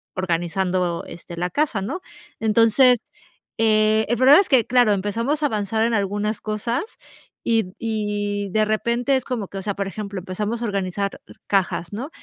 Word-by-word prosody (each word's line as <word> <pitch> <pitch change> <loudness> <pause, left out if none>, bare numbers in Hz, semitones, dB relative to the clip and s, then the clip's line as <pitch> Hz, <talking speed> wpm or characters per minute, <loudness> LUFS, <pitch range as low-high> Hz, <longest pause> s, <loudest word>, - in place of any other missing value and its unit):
organizando, 180 0 -1
este, 170 0 -10
la 180 +1 -2
casa, 280 -8 0
¿no? 280 - -3 0.4
Entonces, 230 +3 +4 0.6
eh, 215 0 +3
el 240 - +2
problema 270 +7 +7
es 395 - +2
que, 255 -5 +4
claro, 245 -4 +4
empezamos 230 +10 -1
a - - +4
avanzar 220 -2 -1
en 230 +1 +1
algunas 205 +1 -1
cosas 215 +3 -2 0.6
y 225 -5 +1
y 205 -2 -2
de 215 +3 +2
repente 235 +5 +1
es 260 - 0
como 235 -6 -3
que, 195 - -8
o - - -5
sea, 200 0 -3
por 200 -1 -2
ejemplo, 200 0 -6
empezamos 210 +5 -3
a - - -1
organizar 200 -1 -2 0.3
cajas, 190 -2 0
¿no? 250 +9 -4
215 Hz, 165 wpm, -22 LUFS, 195-235 Hz, 0.6 s, problema